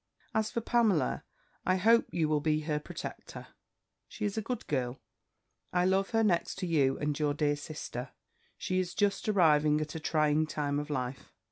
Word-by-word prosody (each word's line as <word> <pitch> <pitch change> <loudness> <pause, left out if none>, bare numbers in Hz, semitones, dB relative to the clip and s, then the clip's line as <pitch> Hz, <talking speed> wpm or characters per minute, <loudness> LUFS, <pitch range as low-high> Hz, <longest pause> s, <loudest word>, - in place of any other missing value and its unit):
"'As 220 -1 +1
for 235 - -2
Pamela, 220 - +2 0.4
I 185 - +2
hope 225 +5 +4
you 165 -3 0
will 150 -1 +2
be 155 +1 +1
her 150 -1 -1
protector! - - -8 0.6
She 210 - -5
is 205 - -1
a 220 - -1
good 240 +1 -4
girl: 130 -3 -2 0.7
I 180 0 +2
love 190 +1 +2
her 225 -1 +2
next 175 -5 +1
to 190 - -4
you 140 -6 +2
and 150 0 -2
your 145 -1 +1
dear 145 -1 +1
sister. 145 -4 -6 0.5
She 185 0 -1
is 180 -1 -3
just 205 0 +1
arriving 155 -6 +4
at 155 0 -4
a 160 - -4
trying 155 0 +2
time 145 -2 -1
of 145 +1 -5
life. 130 -2 -4
155 Hz, 180 wpm, -31 LUFS, 150-195 Hz, 0.7 s, hope